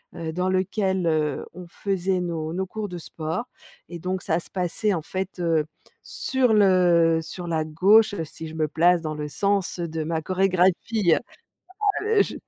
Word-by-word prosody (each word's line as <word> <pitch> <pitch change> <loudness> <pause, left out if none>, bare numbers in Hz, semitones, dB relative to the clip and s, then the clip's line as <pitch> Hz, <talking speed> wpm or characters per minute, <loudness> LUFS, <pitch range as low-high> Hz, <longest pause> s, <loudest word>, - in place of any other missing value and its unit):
heu, 165 -1 -4
dans 180 +2 0
lequel, 190 -1 0
heu, 155 -3 0
on 180 +1 -9
faisait 190 0 -1
nos 165 -2 -3
nos 190 +1 -1
cours 215 +2 -5
de 180 - -6
sport 165 +7 -4 0.4
et 175 - -6
donc 185 +2 -3
ça 160 +1 0
se - - -9
passait 190 +3 0
en 170 - -1
fait, 185 +3 -5
heu, 165 -3 +1 0.4
sur 255 -4 0
le 175 -5 +4
sur 175 +2 -7
la 160 -2 0
gauche, 200 +8 +4
si 160 +1 -8
je 160 - -9
me 155 -1 0
place 175 +3 +3
dans 155 -1 -4
le 150 0 -4
sens 200 +3 0
de 160 -2 -3
ma 160 0 -2
chorégraphie, 185 +1 +2
heu, - - 0 0.8
ah, - - -5
heu, 435 -2 +4
je - - -5
180 Hz, 185 wpm, -24 LUFS, 160-190 Hz, 0.8 s, le